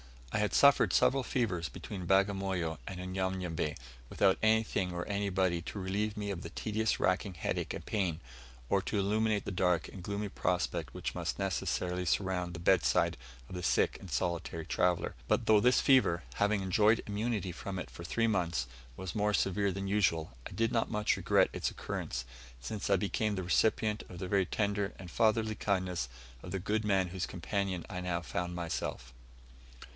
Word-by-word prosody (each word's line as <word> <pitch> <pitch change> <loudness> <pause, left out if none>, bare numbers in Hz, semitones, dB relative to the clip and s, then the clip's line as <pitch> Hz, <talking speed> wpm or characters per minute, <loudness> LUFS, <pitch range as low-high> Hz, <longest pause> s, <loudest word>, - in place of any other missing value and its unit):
I - - +1
had 105 0 0
suffered 140 0 +6
several 135 +1 +4
fevers 95 - -1
between 95 -4 -7
Bagamoyo 95 -4 +1
and 95 -2 -5
Unyanyembe, 90 -4 -2 0.3
without 95 -1 +3
anything 110 -4 +2
or 85 0 -3
anybody 95 -4 0
to 105 - -6
relieve 105 +3 -1
me 105 -1 -2
of 90 -4 -4
the 85 - -6
tedious 110 +3 -1
racking 95 +1 +1
headache - - -2
and - - -8
pain, 90 -7 -1 0.5
or 100 - +2
to 105 - -2
illumine 105 +2 +2
the - - -3
dark 90 -2 +1
and 95 - -9
gloomy 100 +2 -3
prospect 90 -2 -1
which - - -4
must - - -3
necessarily 90 -1 -1
surround 90 0 0
the 85 - -6
bedside 95 +1 +3 0.3
of - - -11
the 90 - -4
sick 90 - +2
and 95 - -10
solitary 85 +2 -2
traveller. 90 +1 +1
But - - +2
though 110 -1 +6
this 125 +4 +4
fever, 115 -11 +4
having 105 -1 +2
enjoyed 105 +5 +3
immunity 105 -2 -2
from 95 +2 -5
it 90 - -5
for 85 - -9
three 115 +7 +1
months, 85 - 0 0.3
was 95 -3 -5
more 105 -1 +2
severe 100 +1 +1
than 95 +1 -4
usual, 90 -6 +1 0.2
I - - -14
did 115 +1 0
not 115 - +1
much 105 -1 +1
regret - - +3
its - - -1
occurrence, 60 0 -4 0.3
since 105 - -4
I 100 - +5
became 105 +2 0
the 95 - -3
recipient 105 +3 +2
of 90 - -9
the 90 +1 -5
very 100 -1 +3
tender 100 -1 -1
and 90 -3 -9
fatherly 110 -1 +2
kindness 90 -10 -1 0.3
of 90 - -8
the 95 +2 -2
good 105 +3 -1
man 95 -3 +2
whose 95 0 -3
companion 95 0 -2
I 90 - -5
now 90 -1 -1
found 90 +1 -3
myself. 80 -7 -4
95 Hz, 180 wpm, -32 LUFS, 90-105 Hz, 0.5 s, suffered